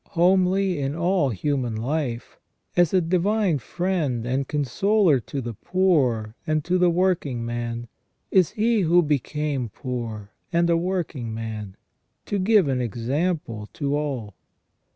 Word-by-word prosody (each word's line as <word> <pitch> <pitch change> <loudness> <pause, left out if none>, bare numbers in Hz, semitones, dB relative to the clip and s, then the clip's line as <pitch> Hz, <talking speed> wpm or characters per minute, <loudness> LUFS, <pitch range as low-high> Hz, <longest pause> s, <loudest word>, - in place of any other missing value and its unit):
Homely 185 0 +3
in 140 +1 -2
all 170 -3 +2
His 105 -7 -6
human 130 -6 0
life, 125 0 -3 0.4
as 175 -3 +4
a 185 - +3
divine 185 0 +1
friend 150 - -1
and 130 +2 -1
consoler 155 - +2
to 135 +3 -5
the 120 -1 -5
poor 130 - +1
and 155 -1 0
to 180 +1 +1
the 180 -1 +5
working 165 -9 0
man, 120 0 -4 0.4
is 185 -4 +4
He 220 0 +1
who 175 0 +4
became 145 -3 -1
poor, 115 -4 -5 0.2
and 170 0 +2
a - - +4
working 165 -10 -2
man, 110 -3 -6 0.5
to 205 - -1
give 200 -3 +4
an 130 -2 0
example 120 - -2
to 140 -1 -1
all. 135 -9 -3
150 Hz, 140 wpm, -24 LUFS, 120-180 Hz, 0.5 s, the